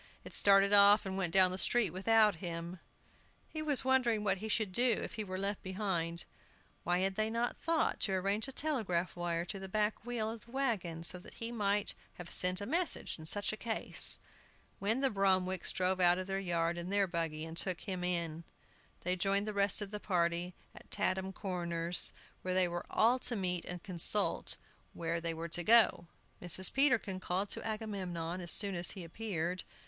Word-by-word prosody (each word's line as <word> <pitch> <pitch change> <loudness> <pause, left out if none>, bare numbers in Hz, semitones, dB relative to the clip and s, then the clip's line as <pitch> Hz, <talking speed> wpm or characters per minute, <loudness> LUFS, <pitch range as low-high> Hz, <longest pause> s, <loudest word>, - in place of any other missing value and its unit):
It - - -10
started 200 0 +5
off 205 +1 +6
and 190 -1 -4
went 190 -3 -2
down 185 0 +6
the 185 - -2
street 235 -5 +3
without 210 +1 +3
him! 170 0 -6 0.7
He 310 - -6
was 290 -4 +3
wondering 245 -5 +2
what 195 -2 +1
he 220 +2 -6
should 215 -2 0
do 240 +3 +2
if - - -6
he 220 -2 -4
were 185 -2 -6
left 200 +1 -2
behind 185 -4 -3 0.6
(why 175 +1 0
had 195 0 0
they 215 +2 -1
not 235 +2 -2
thought 330 -1 -1
to 195 - 0
arrange 200 +4 -1
a - - -7
telegraph 220 - -2
wire 175 -1 -2
to 195 +2 -5
the 190 0 -8
back 210 +2 -1
wheel 230 -2 -2
of 225 -1 -10
the 235 - -18
wagon, 200 -12 -2
so 180 +1 +1
that - - -13
he 230 +1 -6
might 205 -3 -1 0.2
have 175 -1 -8
sent 180 +1 +2
a - - -3
message 335 - +1
in 155 - -5
such 205 +4 +1
a - - -6
case!), 225 -1 +2 0.6
when 220 +6 0
the 270 - +2
Bromwicks 190 -2 +1
drove 185 0 -1
out 175 -1 +4
of 185 - -4
their 195 0 -3
yard 170 -2 -1
in 170 +1 -6
their 200 0 +2
buggy, 165 -3 -4
and 165 0 -9
took 180 0 0
him 185 -3 -5
in. 170 -2 -2 0.6
They 180 +1 -1
joined 200 +3 +1
the 215 - -3
rest 200 +1 +2
of 200 - -8
the 210 - -5
party 175 -2 -1 0.2
at - - -15
Tatham 190 0 -1
Corners, 175 -3 +2 0.3
where 185 0 -2
they 185 -1 +3
were 175 0 -6
all 240 +4 +2
to 245 - -1
meet 180 -3 -2
and 180 -1 -6
consult 195 +2 +1 0.4
where 165 0 -3
they 165 -1 -3
were 165 +1 -6
to 175 +2 -1
go. 225 -4 +4 0.3
Mrs. 180 +1 +7
Peterkin 245 -9 +2
called 185 +2 -2
to - - 0
Agamemnon, 185 -6 -4
as 175 - -3
soon 200 -2 0
as 175 -1 -1
he 190 - -8
appeared. 180 -1 -4
190 Hz, 200 wpm, -33 LUFS, 175-215 Hz, 0.7 s, Mrs